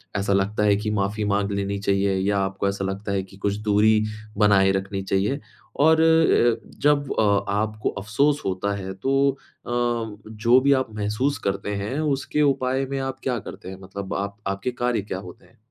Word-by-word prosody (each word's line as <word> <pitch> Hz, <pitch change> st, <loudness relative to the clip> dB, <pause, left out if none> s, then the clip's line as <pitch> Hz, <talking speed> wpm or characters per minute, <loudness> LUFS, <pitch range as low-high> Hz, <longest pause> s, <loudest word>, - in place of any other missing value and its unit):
ऐसा 100 Hz, 0 st, +1 dB
लगता 100 Hz, +2 st, +1 dB
है 105 Hz, -1 st, +4 dB
कि 105 Hz, +2 st, -2 dB
माफ़ी 105 Hz, +1 st, -1 dB
माँग 100 Hz, 0 st, 0 dB
लेनी 100 Hz, 0 st, -2 dB
चाहिए 100 Hz, 0 st, +1 dB
या 100 Hz, +1 st, +1 dB
आपको 95 Hz, 0 st, -1 dB
ऐसा 100 Hz, 0 st, -2 dB
लगता 100 Hz, +1 st, -4 dB
है 95 Hz, -1 st, 0 dB
कि 95 Hz, 0 st, -15 dB
कुछ 100 Hz, 0 st, -1 dB
दूरी 105 Hz, +1 st, +4 dB, 0.4 s
बनाए 100 Hz, -2 st, +5 dB
रखनी 95 Hz, 0 st, -2 dB
चाहिए? 100 Hz, +8 st, 0 dB, 0.4 s
और 160 Hz, +2 st, +5 dB
अ, 160 Hz, -8 st, +3 dB
जब 145 Hz, -1 st, +2 dB
अ, 100 Hz, -2 st, +3 dB
आपको 110 Hz, +1 st, -1 dB
अफ़सोस 140 Hz, +9 st, +1 dB
होता 95 Hz, +2 st, -1 dB
है 95 Hz, -1 st, -5 dB
तो 135 Hz, +7 st, +2 dB
अ, 135 Hz, -, -16 dB
जो 115 Hz, -1 st, +1 dB
भी 140 Hz, -, +3 dB
आप 130 Hz, -2 st, +1 dB
महसूस 105 Hz, +7 st, -1 dB
करते 100 Hz, +1 st, -2 dB
हैं, 105 Hz, +9 st, -3 dB
उसके 150 Hz, 0 st, 0 dB
उपाय 135 Hz, -1 st, +1 dB
में 135 Hz, 0 st, -2 dB
आप 135 Hz, 0 st, -4 dB
क्या 125 Hz, -2 st, 0 dB
करते 95 Hz, -, -9 dB
हैं? 95 Hz, 0 st, -9 dB
मतलब 95 Hz, +1 st, -6 dB
आप 100 Hz, +1 st, -3 dB
आपके 100 Hz, +6 st, -2 dB
कार्य 120 Hz, -3 st, +1 dB
क्या 95 Hz, -2 st, -5 dB
होते 90 Hz, -2 st, -12 dB
हैं? 90 Hz, -, -25 dB
105 Hz, 185 wpm, -24 LUFS, 100-125 Hz, 0.4 s, बनाए